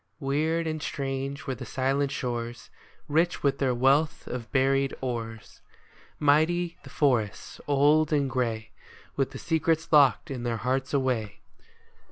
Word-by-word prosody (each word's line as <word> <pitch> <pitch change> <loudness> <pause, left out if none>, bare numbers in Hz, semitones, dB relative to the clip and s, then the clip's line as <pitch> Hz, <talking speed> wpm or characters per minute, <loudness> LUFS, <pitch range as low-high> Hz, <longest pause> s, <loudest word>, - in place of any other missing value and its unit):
Weird 155 +4 0
and 155 -1 -3
strange 135 0 -4
were 135 - -2
the 125 - -7
silent 135 +1 0
shores, 120 -3 -4 0.4
Rich 165 +4 +1
with 140 -1 +1
their 130 -3 +1
wealth 140 +5 +2
of 120 -2 -6
buried 135 0 +2
ores; 115 -3 -5 0.6
Mighty 165 +4 +2
the - - -11
forests, 120 -8 0
old 145 +2 +4
and 145 -2 +2
gray, 115 -4 -2 0.4
With 135 -1 0
the - - -9
secrets 160 0 0
locked 145 +1 +5
in 130 -3 -4
their 120 -1 -1
hearts 130 +3 -1
away. 125 -7 -1
135 Hz, 140 wpm, -27 LUFS, 125-150 Hz, 0.6 s, locked